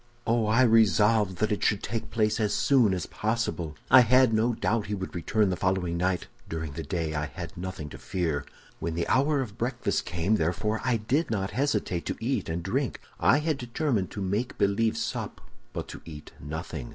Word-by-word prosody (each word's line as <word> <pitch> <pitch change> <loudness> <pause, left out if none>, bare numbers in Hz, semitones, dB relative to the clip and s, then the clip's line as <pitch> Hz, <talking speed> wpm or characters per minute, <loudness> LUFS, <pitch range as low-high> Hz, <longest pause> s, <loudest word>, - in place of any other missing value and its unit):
"Oh, 115 -1 +2
I 115 +4 +4
resolved 110 -3 +4
that 110 +2 0
it 105 - -1
should 105 - +2
take 115 -1 -3
place 110 -1 +1
as 105 -2 +1
soon 125 -7 +4
as 90 -4 -1
possible. 95 -9 -2 0.2
I 130 - +10
had 125 0 +5
no 115 +2 +2
doubt 105 +2 0
he 105 - -1
would 95 -1 -6
return 100 +3 +1
the - - 0
following 90 -2 0
night. 90 +1 0 0.2
During 80 -2 -4
the 80 +3 -5
day 80 0 -2
I 75 0 -1
had 85 -2 -8
nothing 90 -4 -5
to - - -10
fear. 80 -6 -2 0.4
"When 85 -1 -3
the 85 - -1
hour 140 +2 +3
of 105 -6 -7
breakfast 125 +1 -1
came, 90 +6 +1
therefore, 105 +7 -1
I 125 -2 +2
did 130 +10 0
not 100 -3 -1
hesitate 110 -10 -1
to - - -2
eat 115 -4 -1
and 85 +1 -2
drink. 125 +7 -1 0.2
I 130 - +5
had 150 -1 -1
determined 120 - -1
to 100 - -6
make 105 +7 -2
believe 100 +3 +2
sup, - - -3 0.3
but - - -5
to - - -8
eat 75 -2 -10
nothing. 75 -2 -6
105 Hz, 200 wpm, -27 LUFS, 85-115 Hz, 0.4 s, I